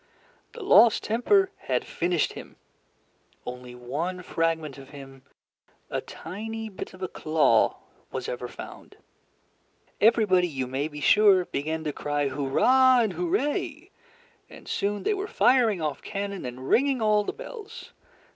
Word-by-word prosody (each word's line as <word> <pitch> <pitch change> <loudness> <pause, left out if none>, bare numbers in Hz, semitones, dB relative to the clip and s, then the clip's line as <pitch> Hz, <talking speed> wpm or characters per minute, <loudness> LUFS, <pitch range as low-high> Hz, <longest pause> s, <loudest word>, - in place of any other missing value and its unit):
The 470 - -8
lost 230 - +6
temper 375 - +2 0.2
had - - 0
finished 175 -2 -1
him. - - -11 0.9
Only 125 0 -8
one 155 +10 -4
fragment 160 -4 -2
of 135 - -13
him, 135 -2 -12 0.7
a - - -1
tiny 220 +5 -7
bit 190 -1 -8
of 185 - -10
a - - -1
claw, 155 -2 +2 0.4
was - - -4
ever - - -4
found. - - -11 1.0
Everybody, 205 -5 +4
you 135 -5 -3
may 135 +4 -2
be 150 -1 -9
sure, 200 -2 +5
began 160 +2 -3
to 150 -2 -3
cry 145 -1 -1
"Hurrah" 245 - +4
and 220 -4 0
"Hooray," 345 -4 -2 0.6
and - - -14
soon 205 +1 -2
they 425 - +1
were 400 0 -3
firing 245 - +3
off 150 -2 -3
cannon 200 -4 -5
and 125 +1 -7
ringing 270 0 +3
all 210 -1 +3
the - - -3
bells. 470 -2 -10
185 Hz, 140 wpm, -26 LUFS, 145-240 Hz, 1.0 s, lost